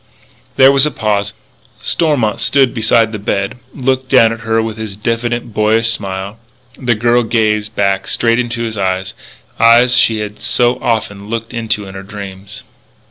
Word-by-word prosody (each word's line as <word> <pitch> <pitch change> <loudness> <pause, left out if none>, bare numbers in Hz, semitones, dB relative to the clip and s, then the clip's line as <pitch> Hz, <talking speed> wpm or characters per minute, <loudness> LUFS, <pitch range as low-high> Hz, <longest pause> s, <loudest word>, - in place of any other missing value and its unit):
There 135 +1 +7
was 140 +1 +4
a - - 0
pause; 105 -5 -1 0.5
Stormont 145 -11 0
stood 135 -4 +2
beside 115 -1 +2
the 105 - -5
bed, 100 +3 -2
looking 130 -1 -1
down 115 -2 +4
at 115 - -8
her 115 0 0
with 110 -1 -2
his 110 -3 -6
diffident, 115 +1 -2
boyish 110 +2 +2
smile. 100 0 -5 0.4
And 125 - -11
the 120 - +3
girl 120 +2 +2
gazed 110 -2 0
back 100 -1 0
straight 115 0 +1
into 120 -1 -2
his 110 -2 -4
eyes 95 0 -2 0.5
eyes 120 +2 +5
she 110 - +3
had 105 0 -6
so 120 0 +1
often 105 -3 -2
looked 115 +1 -4
into 110 -3 -2
in 95 - -10
her 95 - -7
dreams. 100 0 -9
110 Hz, 170 wpm, -15 LUFS, 105-120 Hz, 0.5 s, There